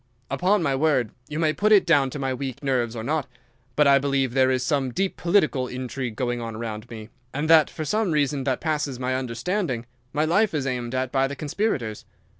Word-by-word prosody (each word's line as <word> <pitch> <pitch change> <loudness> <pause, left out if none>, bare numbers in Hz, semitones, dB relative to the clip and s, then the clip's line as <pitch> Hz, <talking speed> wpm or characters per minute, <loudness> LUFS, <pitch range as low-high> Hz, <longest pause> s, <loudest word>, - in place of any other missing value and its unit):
"Upon 185 +1 +2
my 140 -3 +1
word, 135 -6 +1 0.2
you 150 - -4
may 155 -1 +2
put 210 +8 +1
it 205 -2 +6
down 145 -6 +4
to 140 - -6
my 135 -2 -1
weak 130 +1 -5
nerves 125 -4 0
or 110 - -4
not, 145 +2 -1 0.5
but 150 - +4
I 140 0 +6
believe 135 -2 0
there 130 0 +4
is 130 -1 +1
some 135 -3 0
deep 190 +9 -1
political 155 -8 +2
intrigue 125 -2 -5
going 120 -1 -2
on 115 -1 -5
around 110 0 -6
me, 110 -1 -9 0.3
and 145 +3 -1
that 160 -2 +7
for 155 - -5
some 210 +3 0
reason 145 -2 +1
that 130 -2 0
passes 150 -5 -1
my 130 0 -1
understanding 130 - -2 0.3
my 150 +1 +1
life 185 +3 +2
is 140 -3 -1
aimed 125 -2 -3
at 130 -1 -1
by 135 0 +2
the 140 - -6
conspirators. 145 - -2
135 Hz, 215 wpm, -24 LUFS, 125-155 Hz, 0.5 s, that